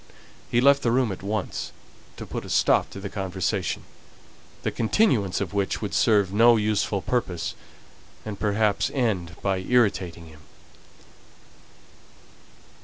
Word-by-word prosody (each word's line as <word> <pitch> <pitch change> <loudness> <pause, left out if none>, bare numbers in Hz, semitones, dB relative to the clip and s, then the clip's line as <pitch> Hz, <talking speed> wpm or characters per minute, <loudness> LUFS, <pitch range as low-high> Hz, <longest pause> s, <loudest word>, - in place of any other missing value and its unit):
He 120 - +2
left 140 +1 +5
the 120 - +1
room 120 -2 +2
at 95 - -7
once, 105 0 -3 0.5
to - - -7
put - - -5
a - - -10
stop - - +3
to - - -9
the 100 - -5
conversation, 95 -1 -2 0.8
the - - -1
continuance 115 - +1
of 100 -1 -4
which 100 -1 -1
would 105 - -4
serve 100 -4 +3
no 115 +2 +6
useful 105 -2 0
purpose, 95 -9 -2 0.7
and 105 -2 -6
perhaps 105 0 +1
end 100 -10 -1
by 95 -1 +1
irritating 95 -6 0
him. 80 -1 -15
100 Hz, 130 wpm, -25 LUFS, 95-115 Hz, 0.8 s, no